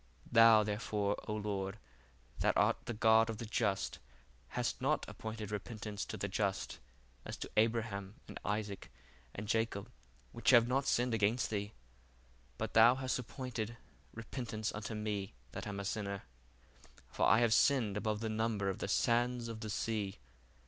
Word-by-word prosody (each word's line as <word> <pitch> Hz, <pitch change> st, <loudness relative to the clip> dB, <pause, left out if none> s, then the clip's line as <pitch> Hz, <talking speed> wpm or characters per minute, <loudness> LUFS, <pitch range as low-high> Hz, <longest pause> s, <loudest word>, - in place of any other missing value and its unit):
Thou 115 Hz, -2 st, +8 dB
therefore, 105 Hz, -1 st, -1 dB
O 105 Hz, -, -1 dB
Lord, 100 Hz, -1 st, -3 dB, 0.6 s
that -, -, +2 dB
art -, -, +4 dB
the 120 Hz, -, -3 dB
God 110 Hz, +1 st, +5 dB
of 110 Hz, -, -3 dB
the 115 Hz, -, -5 dB
just, 105 Hz, -3 st, -1 dB, 0.5 s
hast -, -, -2 dB
not -, -, +1 dB
appointed 110 Hz, -1 st, -6 dB
repentance 105 Hz, -1 st, -4 dB
to -, -, -6 dB
the 100 Hz, -, -2 dB
just, 100 Hz, 0 st, -2 dB, 0.4 s
as -, -, -6 dB
to -, -, -6 dB
Abraham, 110 Hz, -3 st, +1 dB
and -, -, -8 dB
Isaac, 105 Hz, -1 st, -3 dB, 0.5 s
and 105 Hz, +1 st, -5 dB
Jacob, 115 Hz, -2 st, -1 dB, 0.4 s
which 120 Hz, -, 0 dB
have 120 Hz, -2 st, +7 dB
not 135 Hz, +2 st, +1 dB
sinned 120 Hz, 0 st, +2 dB
against 110 Hz, +3 st, +1 dB
thee; 105 Hz, 0 st, -2 dB, 0.8 s
but -, -, -3 dB
thou 115 Hz, +3 st, +8 dB
hast 130 Hz, -1 st, -1 dB
appointed 120 Hz, -2 st, -5 dB, 0.3 s
repentance 115 Hz, -1 st, -4 dB
unto 105 Hz, +1 st, -5 dB
me 105 Hz, -6 st, -3 dB, 0.2 s
that -, -, -6 dB
am 100 Hz, -1 st, -4 dB
a 100 Hz, -, -4 dB
sinner: 100 Hz, -1 st, -3 dB, 0.8 s
for -, -, +1 dB
I 110 Hz, -, +6 dB
have 115 Hz, -2 st, +4 dB
sinned 115 Hz, -5 st, +3 dB
above 105 Hz, 0 st, -1 dB
the 115 Hz, -, -1 dB
number 110 Hz, -2 st, 0 dB
of 95 Hz, -, -7 dB
the -, -, -2 dB
sands 120 Hz, +2 st, +2 dB
of 115 Hz, -1 st, -6 dB
the 110 Hz, -1 st, -5 dB
sea. 105 Hz, -2 st, -2 dB
110 Hz, 160 wpm, -35 LUFS, 105-115 Hz, 0.8 s, Thou